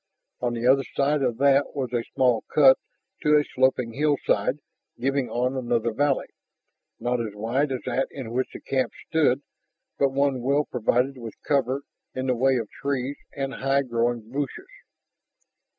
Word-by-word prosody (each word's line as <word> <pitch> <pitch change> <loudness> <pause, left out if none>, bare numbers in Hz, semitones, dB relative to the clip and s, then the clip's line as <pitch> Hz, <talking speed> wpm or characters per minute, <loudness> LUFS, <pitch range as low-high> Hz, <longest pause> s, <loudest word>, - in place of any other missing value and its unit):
On 120 -1 -1
the 115 +1 -3
other 135 +2 +5
side 145 +1 +2
of 120 -4 0
that 140 +2 +3
was 130 -3 -3
a 120 -1 0
small 125 -4 +3
cut 135 -3 +6 0.4
to 150 0 +5
a 150 - +3
sloping 130 -4 +1
hillside, 145 +2 +1 0.4
giving 135 +1 0
on 125 +2 0
another 120 -2 0
valley, 140 +2 +1 0.7
not 120 0 0
as 110 -3 -5
wide 125 +7 0
as 130 - -2
that 130 +1 0
in 130 -5 -7
which 130 +2 0
the - - -9
camp 130 -1 -1 0.2
stood, 145 -4 +2 0.6
but 140 - +4
one 135 -1 +1
well 140 +4 +2
provided 125 +2 0
with 115 -2 -8
cover 140 -1 +1 0.3
in 130 0 -2
the 130 -1 +1
way 130 +2 +3
of 115 -3 -1
trees 140 0 -2 0.2
and 135 -1 -2
high 135 +1 +1
growing 120 -2 -1
bushes. 140 0 -4
130 Hz, 165 wpm, -25 LUFS, 120-140 Hz, 0.7 s, cut